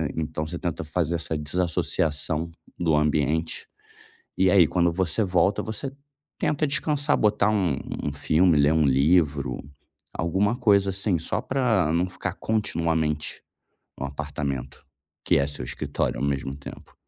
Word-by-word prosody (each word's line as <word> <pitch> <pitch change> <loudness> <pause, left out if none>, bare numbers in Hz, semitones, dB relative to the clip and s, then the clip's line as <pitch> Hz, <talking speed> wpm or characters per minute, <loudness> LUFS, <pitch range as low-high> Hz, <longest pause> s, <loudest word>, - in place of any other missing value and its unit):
então 80 -1 -3
você 85 +2 -5
tenta 85 -3 -3
fazer 80 +1 -1
essa 80 -1 -3
desassociação 80 0 -1 0.3
do 80 -3 +2
ambiente, 75 +1 0 0.7
e 95 0 +4
aí, 95 -3 +6
quando 85 -1 +2
você 90 +2 0
volta, 95 0 +2
você 120 +5 -4 0.5
tenta 150 0 +1
descansar, 145 0 +1
botar 105 -1 +3
um 95 -10 +1 0.3
um 75 - -2
filme, 80 +3 +3
ler 75 +1 +4
um 80 -2 +3
livro, 70 +1 +2 0.5
alguma 95 +7 +1
coisa 100 -5 +3
assim, 95 -1 +1
só 80 - -2
pra 115 - +1
não 90 +2 +1
ficar 90 - -4
continuamente 80 -8 -1 0.6
no 70 - -4
apartamento, 70 -2 -5 0.4
que - - +3
é 70 - +2
o - - -3
seu 65 -3 -4
escritório - - -2
ao - - 0
mesmo 70 -1 -2
tempo. 70 - -11
85 Hz, 145 wpm, -25 LUFS, 75-95 Hz, 0.7 s, aí